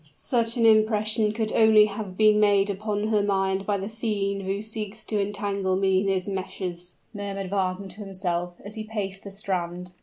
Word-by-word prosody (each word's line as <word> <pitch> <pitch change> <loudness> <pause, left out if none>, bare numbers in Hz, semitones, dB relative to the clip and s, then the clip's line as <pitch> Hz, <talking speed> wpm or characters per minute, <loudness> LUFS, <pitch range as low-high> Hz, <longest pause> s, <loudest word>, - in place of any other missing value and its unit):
"Such 230 - 0
an 230 - +3
impression 215 0 +3
could 220 0 -2
only 220 -1 +6
have 200 -3 -6
been 215 -1 +5
made 205 -1 +4
upon 210 +1 -2
her 210 -2 +3
mind 195 -1 0
by 205 -1 +1
the 195 0 -4
fiend 205 -3 -2
who 195 +1 -2
seeks 215 0 -6
to 210 -2 -1
entangle 200 -1 -1
me 190 0 +2
in 200 - -1
his 190 -1 0
meshes!" 185 -2 -5 0.2
murmured 195 -2 -4
Wagner 190 -1 -1
to 185 +3 -8
himself, 180 -3 -3
as 205 - -7
he 220 -1 -5
paced 200 -3 -4
the 200 - -7
strand. 180 -2 -3
200 Hz, 185 wpm, -26 LUFS, 190-215 Hz, 0.2 s, only